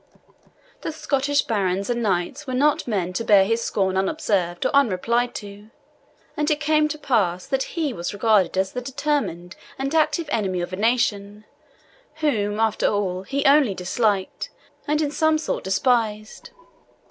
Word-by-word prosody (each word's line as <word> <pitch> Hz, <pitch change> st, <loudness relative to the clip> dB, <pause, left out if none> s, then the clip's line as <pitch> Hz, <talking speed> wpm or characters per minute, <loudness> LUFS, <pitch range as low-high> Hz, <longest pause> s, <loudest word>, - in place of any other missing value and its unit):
The -, -, -3 dB
Scottish 285 Hz, -2 st, 0 dB
barons 195 Hz, -3 st, -1 dB
and 240 Hz, -1 st, -1 dB
knights 210 Hz, +8 st, -1 dB
were 255 Hz, -, -2 dB
not 290 Hz, +1 st, +2 dB
men 185 Hz, -5 st, -1 dB
to 205 Hz, -, -2 dB
bear 200 Hz, -3 st, +5 dB
his 230 Hz, +3 st, 0 dB
scorn 190 Hz, -2 st, 0 dB
unobserved 190 Hz, -, 0 dB
or -, -, +1 dB
unreplied 240 Hz, 0 st, +1 dB
to; 205 Hz, +1 st, -9 dB, 0.7 s
and 300 Hz, 0 st, 0 dB
it 300 Hz, -1 st, +1 dB
came 305 Hz, 0 st, +2 dB
to 305 Hz, 0 st, -5 dB
that 300 Hz, -, -20 dB
pass 185 Hz, -8 st, +1 dB
that 270 Hz, +4 st, -3 dB
he 305 Hz, -5 st, 0 dB
was 170 Hz, -4 st, -4 dB
regarded 205 Hz, -3 st, +2 dB
as 190 Hz, 0 st, +1 dB
the 250 Hz, -, -4 dB
determined 270 Hz, -, -2 dB, 0.2 s
and 275 Hz, +2 st, -3 dB
active 315 Hz, 0 st, +1 dB
enemy 190 Hz, -5 st, -1 dB
of 175 Hz, +1 st, -5 dB
a -, -, 0 dB
nation, 210 Hz, -2 st, 0 dB, 0.7 s
whom, 215 Hz, -10 st, 0 dB
after 225 Hz, -1 st, +1 dB
all, 190 Hz, -3 st, -1 dB
he 275 Hz, +8 st, -3 dB
only 275 Hz, -7 st, +5 dB
disliked, 195 Hz, +1 st, -1 dB, 0.4 s
and 300 Hz, +1 st, +1 dB
in 290 Hz, -, -1 dB
some 315 Hz, 0 st, +2 dB
sort 310 Hz, -, -3 dB
despised. 215 Hz, +1 st, 0 dB
225 Hz, 160 wpm, -23 LUFS, 195-280 Hz, 0.7 s, bear